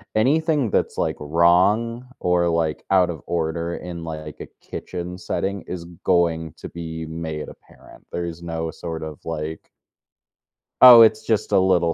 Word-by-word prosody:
anything 145 Hz, +2 st, +2 dB
that's, -, -, 0 dB
like, -, -, 0 dB
wrong 95 Hz, +10 st, +2 dB
or, 90 Hz, -1 st, +2 dB
like, 80 Hz, -2 st, -1 dB
out 90 Hz, -2 st, +4 dB
of 80 Hz, -, -5 dB
order 85 Hz, 0 st, -2 dB
in, 85 Hz, -2 st, -7 dB
like, 80 Hz, -2 st, -7 dB
a -, -, -6 dB, 0.2 s
kitchen 90 Hz, 0 st, -6 dB
setting 100 Hz, 0 st, -3 dB
is 90 Hz, -2 st, -6 dB, 0.2 s
going 80 Hz, -3 st, +1 dB
to -, -, -9 dB
be 80 Hz, -1 st, -6 dB
made 80 Hz, -1 st, -5 dB
apparent, -, -, -17 dB
there's 85 Hz, -1 st, -5 dB
no 80 Hz, -1 st, -3 dB
sort 80 Hz, -1 st, -6 dB
of, 75 Hz, -2 st, -7 dB
like 80 Hz, -1 st, -5 dB, 1.1 s
"Oh, 125 Hz, -2 st, +11 dB
it's 110 Hz, -1 st, +4 dB
just 110 Hz, -2 st, 0 dB
a -, -, +5 dB
little 90 Hz, -3 st, +2 dB
85 Hz, 150 wpm, -22 LUFS, 80-95 Hz, 1.1 s, Oh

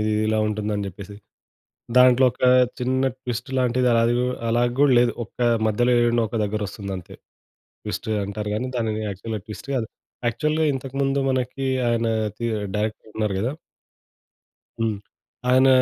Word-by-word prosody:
ఇది 110 Hz, 0 st, 0 dB
ఇలా 110 Hz, 0 st, +1 dB
ఉంటుంది 105 Hz, 0 st, -2 dB
అని 100 Hz, -, -2 dB
చెప్పేసి. 100 Hz, +2 st, -9 dB, 0.8 s
దాంట్లో 125 Hz, +1 st, +7 dB
ఒక -, -, -17 dB, 0.4 s
చిన్న 130 Hz, +2 st, +1 dB
ట్విస్ట్ 125 Hz, -1 st, -4 dB
లాంటిది, 125 Hz, 0 st, +2 dB, 0.2 s
అది 120 Hz, +1 st, +2 dB
కు 125 Hz, -, +1 dB, 0.2 s
అలా 120 Hz, +1 st, +2 dB, 0.2 s
కూడా 145 Hz, -2 st, +5 dB
లేదు. 120 Hz, 0 st, +3 dB
ఒక 110 Hz, -, -17 dB, 0.3 s
మధ్యలో 120 Hz, +3 st, +2 dB
ఏడనో 120 Hz, 0 st, +2 dB
ఒక 115 Hz, -, -4 dB
దగ్గర 105 Hz, +1 st, -2 dB
వస్తుంది 100 Hz, +1 st, -6 dB
అంతే. 90 Hz, -, -10 dB, 0.7 s
ట్విస్ట్ -, -, -4 dB, 0.2 s
అంటారు 105 Hz, +1 st, -4 dB
కానీ, 125 Hz, +4 st, -2 dB
దానిని 110 Hz, -2 st, -1 dB
యాక్చువల్‌గా 105 Hz, +2 st, -5 dB
ట్విస్ట్ 110 Hz, +4 st, -9 dB
కాదు. 120 Hz, -4 st, 0 dB, 0.4 s
యాక్చువల్‌గా 155 Hz, +6 st, 0 dB
ఇంతకుముందు 135 Hz, +1 st, -1 dB
మనకి 130 Hz, +1 st, -2 dB, 0.2 s
ఆయన 115 Hz, -1 st, +1 dB, 0.3 s
టి 115 Hz, -, -2 dB, 0.3 s
డైరెక్టర్ 110 Hz, +1 st, -3 dB
ఉన్నారు 105 Hz, -3 st, 0 dB
కదా! 125 Hz, +7 st, -1 dB, 1.3 s
హ్మ్. 110 Hz, -2 st, 0 dB, 0.5 s
ఆయన 130 Hz, +1 st, +5 dB
115 Hz, 150 wpm, -23 LUFS, 105-125 Hz, 1.3 s, దాంట్లో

